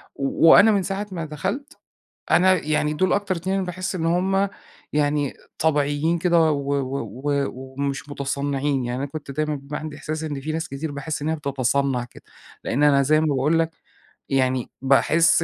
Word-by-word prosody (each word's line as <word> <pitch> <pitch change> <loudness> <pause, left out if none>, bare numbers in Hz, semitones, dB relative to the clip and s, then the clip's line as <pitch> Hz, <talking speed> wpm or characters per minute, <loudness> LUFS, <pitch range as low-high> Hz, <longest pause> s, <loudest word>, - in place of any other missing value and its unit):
و 140 +4 +3
وأنا 220 - +8
من 200 -2 +2
ساعة 195 +3 -3
ما 165 -3 -4
دخلت، 190 - -4 0.5
أنا 185 +1 +6
يعني 150 0 +1
دول 180 +4 +1
أكتر 200 -2 0
2 185 +3 -2
أنا 195 - 0
باحس 185 +2 -4
إن 165 -2 -2
هم 190 +3 +2 0.4
يعني 145 -1 +1 0.3
طبيعيين 150 +1 +1
كده، 170 -2 +3
و 140 -1 -1
و 135 +1 -3 0.3
و 140 -1 +1
ومش 135 +2 -5
مُتصنّعين. 140 -1 -1
يعني 120 +1 -3
أنا 140 - -1
كنت 145 -1 -7
دايمًا 150 +1 -1
بيبقي 140 +2 -6
عندي 155 -2 -7
إحساس 155 +2 -4
إن 145 -3 -4
في 155 +3 -3
ناس 160 +1 -3
كتير، 145 +3 -4
باحس 145 +2 -4
إن 150 - -1
هي 160 - +1
بتتصنّع 140 -3 0
كده، - - -17 0.4
لإن 140 +5 0
أنا 140 -2 +5
زي 155 +3 +3
ما 160 - +1
باقول 150 +3 +2
لك، 165 0 +1 0.6
يعني 130 -2 +1
باحس 155 +5 +4
150 Hz, 185 wpm, -23 LUFS, 140-165 Hz, 0.6 s, وأنا